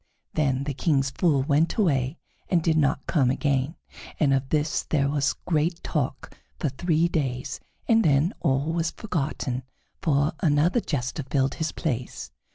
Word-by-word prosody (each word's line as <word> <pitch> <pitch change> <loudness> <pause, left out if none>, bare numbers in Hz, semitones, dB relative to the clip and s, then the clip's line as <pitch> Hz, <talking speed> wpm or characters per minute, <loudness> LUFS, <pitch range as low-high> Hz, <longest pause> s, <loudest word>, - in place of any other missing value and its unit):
Then 140 -3 +1
the 140 0 -3
King's 135 -1 +1
Fool 145 -3 +2
went 150 +3 +2
away 140 - +1 0.3
and 170 -3 +2
did 160 -1 +2
not 145 0 +1
come 135 -7 +2
again, 140 +2 0 0.4
and 140 -3 +4
of 135 0 0
this 150 0 +1
there 140 -3 +1
was 140 0 +1
great 165 +1 0
talk 135 -4 -3 0.2
for 150 - 0
three 165 +4 +1
days, 130 -7 -2 0.3
and 225 -1 +5
then 150 +4 +3
all 140 +1 +1
was 165 -1 0
forgotten, 145 - -3 0.4
for 150 -2 +2
another 165 +5 +3
jester 145 - -2
filled 135 0 0
his 160 -1 -2
place. 125 -6 -4
145 Hz, 155 wpm, -26 LUFS, 135-165 Hz, 0.4 s, and